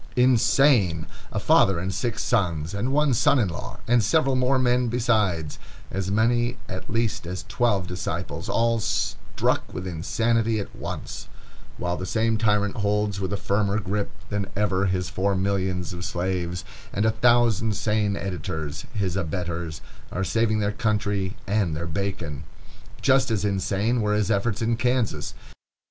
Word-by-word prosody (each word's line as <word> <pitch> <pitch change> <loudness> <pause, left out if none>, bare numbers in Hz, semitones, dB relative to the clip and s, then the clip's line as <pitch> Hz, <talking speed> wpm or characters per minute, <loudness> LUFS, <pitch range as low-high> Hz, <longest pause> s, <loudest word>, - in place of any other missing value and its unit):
Insane! 125 - +4 0.3
A - - -1
father 95 -2 +4
and 95 +3 -2
six 110 +5 -2
sons, 80 -4 0
and 105 +7 -1
one 145 -1 +3
son 140 +4 +4
in 110 -7 +2
law, 85 - -6
and 120 -1 +4
several 135 +4 +3
more 130 +1 +3
men 125 -1 +2
besides,—as 100 -5 -1
many 120 +4 +2
at 95 - -6
least 115 -5 -1
as 90 +1 -5
twelve 105 -6 +1
disciples,—all 115 +5 -1
struck - - -1
with 90 - -5
insanity 110 +6 0
at 100 - -6
once; - - -6 0.5
while 90 0 -2
the 95 - -4
same 115 +2 +1
tyrant 105 -2 +1
holds 105 -1 0
with 95 -1 -2
a 100 - 0
firmer 100 +1 +1
gripe 100 0 -2 0.2
than 100 -2 -1
ever 100 -1 +1
his 90 -1 0
four 95 +2 0
millions 95 -2 -1
of 90 0 -6
slaves, 90 -1 -2 0.3
and 105 - 0
a 110 - +4
thousand 115 -3 +3
sane 105 -1 +1
editors, 85 -6 -4
his 95 -4 -1
abettors, 85 -3 -3 0.3
are 95 - -1
saving 110 +2 +1
their 105 -1 +1
country 105 -2 -1
and 100 -6 +1
their 85 +3 -3
bacon! 85 -4 -3 0.6
Just 135 -1 +4
as 105 -3 0
insane 100 +4 0
were 105 0 +1
his 105 +1 +1
efforts 105 +2 0
in 115 0 +1
Kansas. 125 -2 0
100 Hz, 150 wpm, -25 LUFS, 95-115 Hz, 0.6 s, Insane